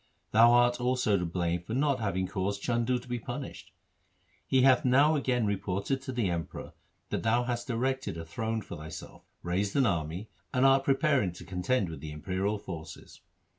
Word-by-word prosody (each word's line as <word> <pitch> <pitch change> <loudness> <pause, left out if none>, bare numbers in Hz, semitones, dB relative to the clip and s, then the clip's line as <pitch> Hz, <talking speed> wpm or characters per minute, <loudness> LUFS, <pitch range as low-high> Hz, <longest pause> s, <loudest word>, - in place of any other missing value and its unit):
Thou 115 +2 +7
art 120 0 +4
also 125 -4 +2
to 90 -2 0
blame 85 0 -1
for 110 +6 -5
not 140 -1 +2
having 95 -4 -1
caused 100 +2 -3
Chandu 120 +1 +1
to 125 +1 -11
be 120 -1 -2
punished. - - -7 0.8
He 130 -1 +3
hath 130 -2 +5
now 140 +5 +5
again 125 -5 +1
reported 100 +5 -1
to 135 - -5
the 120 -5 0
Emperor 85 -2 -4 0.4
that - - -1
thou 115 +2 +2
hast 120 0 -3
erected 130 -3 -1
a 80 - -6
throne 110 +6 -3
for - - -8
thyself, 75 +1 -9 0.2
raised 95 +4 -1
an 140 -2 +4
army, 85 +1 -1 0.3
and 130 +1 +4
art 135 0 +5
preparing 135 - +2
to 90 - -11
contend 95 +4 0
with 80 -3 -7
the 75 +1 -7
imperial 95 +7 -2
forces.' 85 -6 -9
110 Hz, 180 wpm, -29 LUFS, 90-125 Hz, 0.8 s, Thou